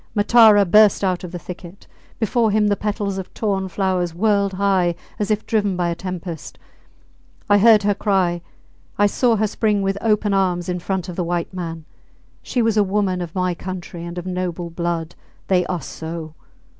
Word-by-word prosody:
Matara 215 -1 +6
burst 210 +2 +5
out 185 -2 0
of 180 - -7
the 180 - -5
thicket; 180 +1 -10 0.3
before 225 +1 +1
him 210 0 +2
the 205 - +2
petals 205 -2 -2
of 190 - -8
torn 195 -3 -1
flowers 185 -2 -1
whirled 200 0 +1
high 185 -3 +1 0.2
as 210 - -1
if 215 0 0
driven 205 -4 0
by 175 -1 0
a - - 0
tempest. 175 -2 -7 0.9
I 205 0 +5
heard 215 0 +6
her 205 0 +3
cry; 185 -4 0 0.6
I 205 - +4
saw 230 +3 +2
her 215 0 +1
spring 210 -1 0
with 195 +1 -1
open 210 -2 +1
arms 180 -3 +1
in 180 0 -2
front 185 +1 -3
of 180 - -6
the 180 - 0
white 175 +1 -2
man. 165 -3 -6 0.6
She 245 - -1
was 225 -1 +1
a 210 - +5
woman 190 -2 0
of 170 0 -7
my 185 -1 0
country 175 -1 -7
and 170 +1 -7
of 175 - -5
noble 180 -2 -3
blood. 170 -1 -3 0.4
They 180 -2 +2
are 180 -3 -2
so! 160 +2 -7
190 Hz, 185 wpm, -21 LUFS, 175-205 Hz, 0.9 s, Matara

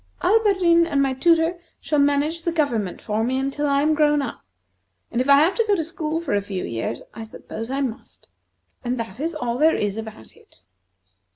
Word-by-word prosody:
Alberdin 375 -6 +4
and 285 -4 0
my 270 -1 +2
tutor 330 +4 +2 0.2
shall 300 - 0
manage 290 +3 +1
the 340 - -1
government 240 - -1
for 215 +1 -1
me 255 +3 0
until 275 +2 -1
I 280 0 +2
am 310 +1 +3
grown 295 -1 +3
up; 275 -4 -5 0.7
and 240 - 0
if 260 - -2
I 280 +1 +7
have 335 +5 +3
to 460 - 0
go 410 - +3
to 330 - -1
school 320 -1 -3
for 335 - -3
a 205 - +2
few 195 -2 -5
years, 115 +1 -4
I 225 - -8
suppose 225 +1 -8
I 270 +1 -2
must. 245 -5 -6 0.6
And 245 0 -2
that 225 -1 -6
is 325 +3 -2
all 245 -4 -3
there 315 +2 +4
is 205 0 -2
about 220 - -9
it!" - - -22
280 Hz, 205 wpm, -22 LUFS, 235-325 Hz, 0.7 s, I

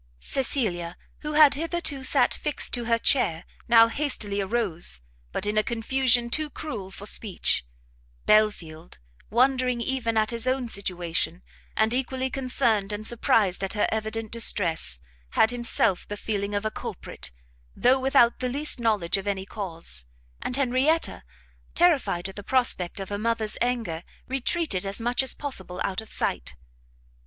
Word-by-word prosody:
Cecilia, 180 - -1 0.2
who 300 0 -5
had 300 -2 +7
hitherto 320 -2 -2
sat 260 -1 +3
fixed 300 -2 -1
to 240 -2 -1
her 230 0 +2
chair, 180 -9 +2 0.2
now 230 0 +7
hastily 230 -6 -2
arose, 190 - 0 0.3
but - - -2
in 210 +1 +2
a - - +2
confusion 240 +1 +2
too 310 +2 -1
cruel 225 -11 -6
for 195 +1 -10
speech: 205 - 0 0.6
Belfield, 175 -7 +1 0.3
wondering 250 +1 +2
even 235 -2 -1
at 215 +1 +2
his 235 +1 -3
own 255 -1 0
situation, 175 -3 -1 0.3
and 220 +1 +3
equally 260 0 -1
concerned 240 -6 +1
and 210 +1 -5
surprised 210 -5 +2
at 195 - -2
her 210 - +1
evident 220 0 -3
distress, 170 - +1 0.4
had 220 - +4
himself 235 -5 +1
the 205 - -5
feeling 205 -1 -2
of 205 +1 -2
a 215 - 0
culprit, - - -7 0.5
though 255 +2 +4
without 260 -3 +4
the 255 0 -1
least 285 +1 +1
knowledge 210 -7 +1
of 195 +1 -6
any 195 -1 -2
cause: 165 - -4 0.4
and 250 - -2
Henrietta, 275 +5 +1 0.5
terrified 280 - +2
at 195 - -10
the 205 - -6
prospect 205 -6 0
of 195 - -5
her 205 0 -3
mother's 225 -1 0
anger, 230 -10 -1 0.2
retreated 270 - 0
as 195 +2 -5
much 240 +2 +1
as 265 - -2
possible 190 -11 -4
out 195 +3 -2
of 220 - -14
sight. - - -2
225 Hz, 150 wpm, -26 LUFS, 195-255 Hz, 0.6 s, had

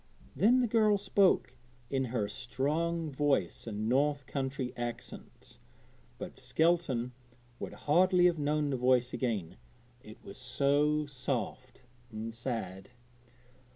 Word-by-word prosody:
Then 245 +5 +5
the 245 - +2
girl 215 -2 +4
spoke 195 -9 +2 0.4
in 135 -1 +1
her 115 -4 -1
strong 150 +7 -2
voice 135 - 0
and 110 0 -3
north 145 +3 +2
country 135 -1 -3
accent, 120 -1 -7 0.6
but - - -8
Skelton 160 -8 +1 0.5
would - - -5
hardly 180 +4 +5
have 175 -3 +3
known 150 0 0
the 130 - 0
voice 125 0 +2
again, 110 -10 -2 0.4
it 110 -1 -12
was 100 - -9
so 145 +4 +2
soft 130 -1 -4 0.3
and 110 +1 -5
sad. 105 -5 -5
135 Hz, 120 wpm, -31 LUFS, 120-150 Hz, 0.6 s, Then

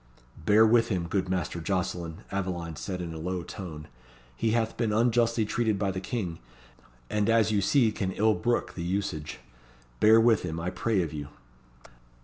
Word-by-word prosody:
"Bear 110 +2 +7
with 115 +1 +4
him, 90 -6 -1
good 95 +1 -1
Master 90 -2 -2
Jocelyn," 85 -2 -3
Aveline 90 -4 -3
said 90 +4 -5
in 85 -2 -5
a 80 - -7
low 90 +2 -3
tone. 80 -5 -8 0.5
"He 110 - 0
hath 115 0 0
been 115 -3 0
unjustly 115 0 +2
treated 110 -1 0
by 100 -1 0
the 95 0 -4
King, 95 -5 -4 0.7
and 105 - 0
as 115 -1 +4
you 105 -2 +2
see 115 +2 +3
can 95 -3 -2
ill 110 +1 +3
brook 120 +6 -1
the 85 - -6
usage. 85 -4 -3 0.6
Bear 110 +1 +7
with 115 -1 +4
him, 80 -2 -4
I 85 +2 -2
pray 110 -5 0
of 80 - -5
you." 75 -2 -5
100 Hz, 175 wpm, -28 LUFS, 85-110 Hz, 0.7 s, Bear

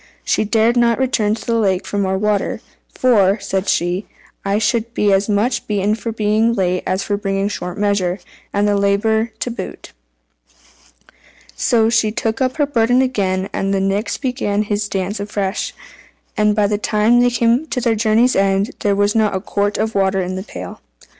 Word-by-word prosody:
She - - +1
dared 225 +2 +2
not 235 -1 +3
return 230 -5 +1
to - - -10
the 230 -1 +1
lake 190 -4 +1
for 205 - -3
more 190 -1 0
water 210 0 0 0.3
"for," 205 -6 +3
said 190 -1 -2
she, 175 +4 0 0.4
"I 200 +1 0
should 230 +2 -1
be 205 -1 +2
as 195 +2 +1
much 210 +5 0
beaten 205 0 0
for 230 +1 -4
being 220 +1 +1
late 185 -3 0
as 190 +1 0
for 205 - -1
bringing 195 -1 -1
short 180 -3 -5
measure, 200 -3 0 0.3
and 205 +1 +1
have 205 - +2
the - - 0
labour 220 +3 +1
to 245 - -2
boot." 230 - -8 1.6
So 225 - +2
she 225 -2 +2
took 220 +2 -2
up 255 +2 0
her 295 - +3
burden 245 -1 +2
again, 195 -7 -1
and 195 0 -1
the - - +1
Nix 200 +2 -1
began 245 -6 -1
his 205 0 -2
dance 195 +2 -2
afresh, 200 -1 -2 0.6
and 210 0 +2
by 210 -1 +2
the 205 0 0
time 215 +3 +2
they 245 0 +4
came 240 +5 +1
to 255 - -2
their 235 -2 +1
journey's 225 +3 +2
end, 195 +1 +1
there 200 -1 +1
was 205 +1 +2
not 215 -3 +1
a - - 0
quart 205 +1 -1
of 220 0 -1
water 195 -1 +1
in 185 +1 -3
the 185 - -4
pail. 195 - -9
210 Hz, 190 wpm, -18 LUFS, 195-230 Hz, 1.6 s, they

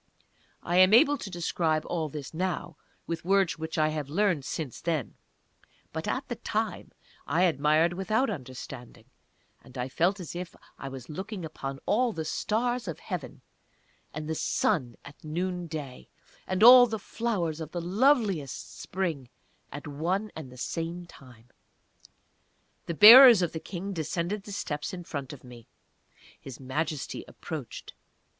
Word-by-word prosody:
I 175 - 0
am 185 +3 +7
able 290 +4 +6
to 200 - -6
describe 165 -3 -1
all 160 -3 -2
this 145 0 -8
now, 175 -1 -3 0.3
with 165 0 -4
words 190 -4 +2
which 160 +1 -5
I 155 0 +3
have 150 -3 -4
learned 175 -2 +1
since 140 -1 -5
then; 160 - -2 0.8
but - - -4
at - - -2
that - - -7
time - - -2 0.4
I 175 - +2
admired 155 0 +3
without 215 +8 0
understanding, 130 - -8 0.6
and 125 - -14
I 125 +1 -3
felt 180 +8 +1
as 175 -3 -7
if 180 0 -6 0.2
I 135 - -6
was 130 -2 -9
looking 190 +3 -6
upon 135 -3 -6
all 240 +2 +2
the 160 -3 -4
Stars 235 +7 -1
of 165 - -4
Heaven, - - -7 0.7
and 155 +1 -6
the 160 - -1
Sun 125 -5 0
at 145 - -14
Noonday, 160 -4 -5 0.4
and 185 +2 0
all 245 +1 +10
the 220 -1 -3
Flowers 195 -7 -3
of 155 - -6
the 175 - -3
loveliest 195 - 0
Spring 165 -9 -3 0.4
at 145 - -8
one 180 +9 -2
and 150 -5 -8
the 125 - -13
same 165 +6 -4
time!... 125 -7 -17 1.4
The 170 - -3
bearers 230 - +10
of 170 - -1
the 160 - -5
King 195 +4 -6
descended 175 +4 -3
the 205 - -8
steps 150 -4 -4
in 175 - -8
front 140 -4 -6
of 145 - -11
me. 120 -2 -13 0.7
His 135 -3 -10
Majesty 145 +2 -3
approached. - - -8
165 Hz, 150 wpm, -28 LUFS, 145-190 Hz, 1.4 s, all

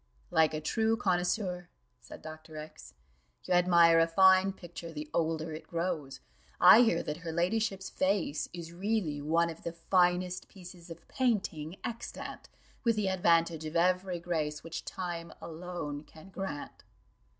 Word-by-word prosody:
"Like 155 -1 +3
a 155 - -3
true 220 +8 +1
connoisseur," 180 -2 -1 0.3
said - - -12
Dr. 155 0 -10
X, 70 - -10 0.5
"you - - -1
admire 170 -2 +6
a 165 - +4
fine 190 +2 +5
picture 175 -2 -9
the 150 -1 -6
older 160 -1 -1
it 155 - -8
grows: 165 -6 -3 0.4
I 185 +6 +9
hear 225 -9 +3
that 150 - -4
her 170 -2 -6
ladyship's 195 +3 -1
face 185 -7 0
is 170 -1 -8
really 180 -6 -1
one 165 +3 +2
of 160 - -12
the 170 - -4
finest 180 +1 +1
pieces 180 -2 -13
of 165 0 -11
painting 190 - -1
extant, 235 0 -6 0.3
with 230 -3 +3
the 210 -3 0
advantage 170 -3 +2
of 155 +1 -6
'Ev'ry 180 +1 +2
grace 155 -3 -2
which 165 0 -6
time 170 -2 -5
alone 165 -3 -6
can 160 +4 -15
grant. 190 -7 -6
170 Hz, 150 wpm, -31 LUFS, 160-185 Hz, 0.5 s, I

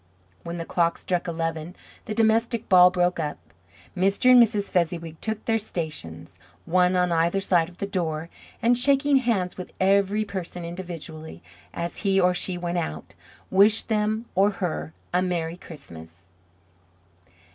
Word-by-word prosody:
When 170 0 -6
the 165 -1 -5
clock 170 -1 +1
struck 180 -1 -2
eleven 165 0 -3 0.3
the 215 - -4
domestic 225 +1 +1
ball 180 -1 +7
broke 180 -1 0
up. 150 -2 -3 0.6
Mr. 195 +7 +3
and 250 -1 +9
Mrs. 210 -3 +1
Fezziwig 165 -2 -1
took 220 -1 -4
their 225 -1 +1
stations, 155 - -6 0.3
one 180 +1 +2
on 180 -1 +2
either 170 +3 +2
side 175 -4 +2
of 180 - -18
the - - -3
door, 165 -5 -3 0.4
and 240 +1 +4
shaking 275 +3 +3
hands 225 -8 0
with 180 - -8
every 200 +2 +2
person 180 -3 -6
individually, 170 -3 -8 0.3
as 170 0 -5
he 195 -2 +2
or 180 -1 +3
she 180 0 -1
went 175 0 -2
out, 75 - -6 0.4
wished 205 +4 +4
him 215 +1 0
or 195 +2 +4
her 80 - -4 0.2
a 180 - +3
Merry 170 -2 -2
Christmas! 85 - -13
180 Hz, 150 wpm, -25 LUFS, 165-205 Hz, 0.6 s, and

